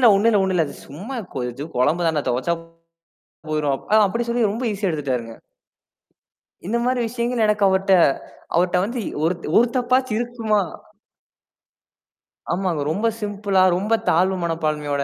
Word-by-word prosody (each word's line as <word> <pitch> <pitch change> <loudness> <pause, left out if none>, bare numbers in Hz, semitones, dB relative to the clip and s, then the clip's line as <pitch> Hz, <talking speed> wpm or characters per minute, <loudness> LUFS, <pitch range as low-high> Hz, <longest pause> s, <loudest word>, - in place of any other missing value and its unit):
"இல்ல, 245 - +7
ஒன்னும் 220 +4 +3
இல்ல, 205 - +4
ஒன்னும் 190 -1 0
இல்ல! 165 -3 +2
அது - - -10
சும்மா 195 - -7 0.2
கொ 130 - -2
இது 140 +5 -7
கொழம்பு 160 +7 +2
தானே? 155 -2 0
தொவச்சா 130 +8 0 1.0
போயிரும்" 150 -2 +1 0.2
அ - - +7
அப்பிடி 230 +4 -2
சொல்லி 235 -3 +2
ரொம்ப 230 +5 -4
ஈஸியா 200 -1 -1
எடுத்துட்டாருங்க. 130 -7 -3 1.3
இந்தமாரி 235 +5 0
விஷயங்கள் 235 0 -1
எனக்கு 210 -1 +1
அவர்ட்ட, 190 0 +2 0.6
அவர்ட்ட 180 +1 +2
வந்து 240 +4 -4
இ - - -2
ஒருத் 170 +1 -1
ஒரு 240 - +5
தப்பாச்சும் 255 -2 +1
இருக்குமா 230 -3 0 1.9
ஆமாங்க. 175 -4 -1
ரொம்ப 210 +8 0
சிம்பிளா 200 -2 +1
ரொம்ப 205 +4 -1 0.2
தாழ்வு 185 +3 +3
மனப்பான்மையோட, 150 -4 -1
190 Hz, 145 wpm, -22 LUFS, 160-230 Hz, 1.9 s, இல்ல